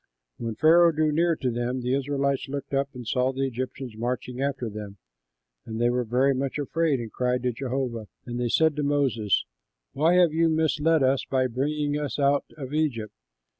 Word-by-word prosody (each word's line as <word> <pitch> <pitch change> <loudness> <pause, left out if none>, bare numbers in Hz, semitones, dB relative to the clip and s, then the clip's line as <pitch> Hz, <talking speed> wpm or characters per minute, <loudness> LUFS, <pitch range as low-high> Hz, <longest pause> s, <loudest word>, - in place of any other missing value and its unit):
When 115 -2 -3
Pharaoh 170 +5 +6
drew 155 -1 +1
near 165 +2 +2
to 130 -4 -2
them 120 +2 -2
the 125 +1 -1
Israelites 140 0 0
looked 140 0 -5
up 135 0 +1
and 125 -1 -7
saw 125 +3 +1
the 135 +1 -1
Egyptians 130 -1 -5
marching 125 +2 -3
after 135 -3 -1
them; 105 -2 -7 0.7
and 110 0 -6
they 120 0 +3
were 125 0 0
very 125 +4 +2
much 135 +1 -2
afraid 150 0 0
and 115 -2 -6
cried 125 0 0
to 125 - +1
Jehovah. 125 -3 -3 0.2
And 120 0 -4
they 120 -1 0
said 160 +4 +3
to - - 0
Moses, 135 -8 +1 0.5
"Why 160 +5 +3
have 175 -3 +5
you 165 +1 +3
misled 160 -1 +2
us 130 +1 +2
by 130 -1 +1
bringing 145 +4 -1
us 145 -1 -3
out 140 0 +2
of 135 -1 -7
Egypt? 135 -9 -1
135 Hz, 190 wpm, -26 LUFS, 125-150 Hz, 0.7 s, Pharaoh